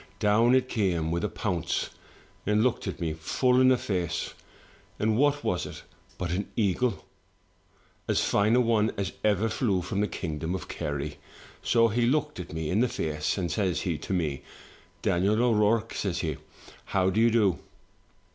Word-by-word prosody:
Down 115 Hz, +4 st, +4 dB
it 130 Hz, -1 st, +2 dB
came 90 Hz, -9 st, 0 dB
with 85 Hz, +3 st, -1 dB
a 105 Hz, -, 0 dB
pounce, 85 Hz, -4 st, -2 dB, 0.6 s
and 105 Hz, +1 st, +3 dB
looked 125 Hz, -1 st, 0 dB
at -, -, -4 dB
me 80 Hz, -3 st, -1 dB
full 125 Hz, -, +2 dB
in 130 Hz, -, +6 dB
the 130 Hz, -1 st, +5 dB
face; 90 Hz, -6 st, -2 dB, 0.6 s
and 110 Hz, 0 st, +1 dB
what 145 Hz, +3 st, +2 dB
was 90 Hz, -, -1 dB
it -, -, -9 dB, 0.3 s
but 90 Hz, -2 st, -3 dB
an 95 Hz, +3 st, -2 dB
eagle? 110 Hz, +1 st, 0 dB, 0.5 s
— -, -, -36 dB
as -, -, +3 dB
fine 105 Hz, +3 st, +3 dB
a 125 Hz, -, +5 dB
one 110 Hz, -2 st, +2 dB
as 100 Hz, -1 st, -2 dB
ever 105 Hz, +1 st, +2 dB
flew 105 Hz, -5 st, 0 dB
from 100 Hz, +2 st, -2 dB
the 105 Hz, -, +1 dB
kingdom 80 Hz, 0 st, -3 dB
of 95 Hz, -, -6 dB
Kerry. 75 Hz, -2 st, -4 dB, 0.4 s
So 115 Hz, -1 st, +3 dB
he 120 Hz, +2 st, +1 dB
looked 150 Hz, 0 st, 0 dB
at 90 Hz, -, -7 dB
me 80 Hz, 0 st, -3 dB
in 100 Hz, -, +2 dB
the 125 Hz, +1 st, +3 dB
face, 75 Hz, -2 st, -2 dB
and 90 Hz, -4 st, -1 dB
says 90 Hz, -2 st, 0 dB
he 85 Hz, -6 st, -2 dB
to -, -, -7 dB
me, 80 Hz, -7 st, -1 dB, 0.6 s
'Daniel 95 Hz, +4 st, +2 dB
O^Rourke,* 115 Hz, -1 st, +2 dB
says 90 Hz, -4 st, -2 dB
he, 80 Hz, -4 st, -2 dB, 0.5 s
*how 95 Hz, -1 st, +1 dB
do 110 Hz, -, +2 dB
you 115 Hz, -, +6 dB
do? 105 Hz, -6 st, +2 dB
100 Hz, 180 wpm, -27 LUFS, 85-115 Hz, 0.6 s, in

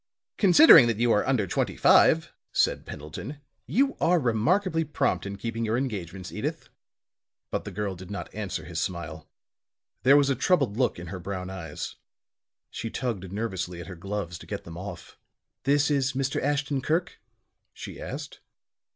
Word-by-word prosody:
"Considering 185 Hz, -, +8 dB
that 115 Hz, -3 st, 0 dB
you 120 Hz, +1 st, +2 dB
are 105 Hz, -, +3 dB
under 130 Hz, -6 st, +2 dB
twenty 90 Hz, -, -1 dB
five," 160 Hz, 0 st, +5 dB, 0.2 s
said -, -, +1 dB
Pendleton, 85 Hz, -, -7 dB, 0.3 s
"you 275 Hz, +3 st, +2 dB
are 175 Hz, +1 st, +4 dB
remarkably 160 Hz, -, +1 dB
prompt 150 Hz, -8 st, -1 dB
in 100 Hz, 0 st, -5 dB
keeping 115 Hz, +2 st, -3 dB
your 110 Hz, +1 st, +1 dB
engagements, 95 Hz, -8 st, -4 dB
Edyth." -, -, -4 dB, 0.8 s
But -, -, -2 dB
the -, -, -6 dB
girl 105 Hz, -2 st, -3 dB
did 90 Hz, +1 st, -11 dB
not 100 Hz, -, -6 dB
answer 105 Hz, -3 st, -4 dB
his -, -, -4 dB
smile. 80 Hz, -3 st, -5 dB, 0.7 s
There 135 Hz, +3 st, +6 dB
was 140 Hz, -1 st, +3 dB
a -, -, +1 dB
troubled 135 Hz, -, +2 dB
look 125 Hz, +1 st, +1 dB
in 85 Hz, -1 st, -8 dB
her 95 Hz, -, -5 dB
brown 95 Hz, 0 st, -5 dB
eyes; 85 Hz, -6 st, -6 dB, 0.7 s
she 115 Hz, -, -4 dB
tugged 110 Hz, -8 st, -3 dB
nervously 95 Hz, -5 st, -3 dB
at 85 Hz, -, -7 dB
her 95 Hz, -, -8 dB
gloves 95 Hz, -1 st, -5 dB
to -, -, -13 dB
get -, -, -5 dB
them 85 Hz, -, -10 dB
off. 95 Hz, +4 st, -8 dB, 0.5 s
"This 145 Hz, +2 st, +3 dB
is 140 Hz, -2 st, +1 dB
Mr. 135 Hz, 0 st, -1 dB
Ashton 140 Hz, 0 st, 0 dB
Kirk?" 165 Hz, +6 st, -1 dB, 0.5 s
she -, -, -9 dB
asked. -, -, -7 dB
115 Hz, 165 wpm, -27 LUFS, 95-140 Hz, 0.8 s, Considering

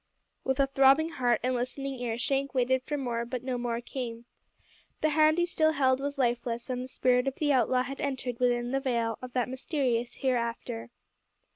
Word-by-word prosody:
With 265 Hz, +1 st, -1 dB
a 275 Hz, -, +5 dB
throbbing 275 Hz, +3 st, +4 dB
heart 245 Hz, -7 st, +1 dB
and 255 Hz, +1 st, +1 dB
listening 260 Hz, +2 st, -3 dB
ear 235 Hz, -2 st, -2 dB
Shank 275 Hz, +2 st, -1 dB
waited 260 Hz, +1 st, +2 dB
for 295 Hz, +3 st, -3 dB
more; 240 Hz, -4 st, -2 dB
but 245 Hz, +1 st, -5 dB
no 255 Hz, -1 st, -2 dB
more 240 Hz, -1 st, -2 dB
came. 240 Hz, -2 st, -6 dB, 0.8 s
The 310 Hz, -, +3 dB
hand 310 Hz, +1 st, +4 dB
he 345 Hz, -, +3 dB
still 315 Hz, -2 st, +2 dB
held 260 Hz, -2 st, +3 dB
was 285 Hz, +1 st, -3 dB
lifeless, 240 Hz, -1 st, -1 dB
and 250 Hz, 0 st, -2 dB
the 255 Hz, -, -5 dB
spirit 250 Hz, 0 st, +2 dB
of 270 Hz, -, -1 dB
the 290 Hz, -2 st, +1 dB
outlaw 250 Hz, 0 st, +3 dB
had 275 Hz, +2 st, -6 dB
entered 260 Hz, -3 st, -3 dB
within 245 Hz, -1 st, +1 dB
the 270 Hz, -, +1 dB
veil 235 Hz, -4 st, -1 dB
of 250 Hz, -1 st, -8 dB
that 250 Hz, -2 st, +1 dB
mysterious 255 Hz, -3 st, -1 dB
Hereafter. 235 Hz, -, -2 dB
255 Hz, 190 wpm, -29 LUFS, 240-275 Hz, 0.8 s, a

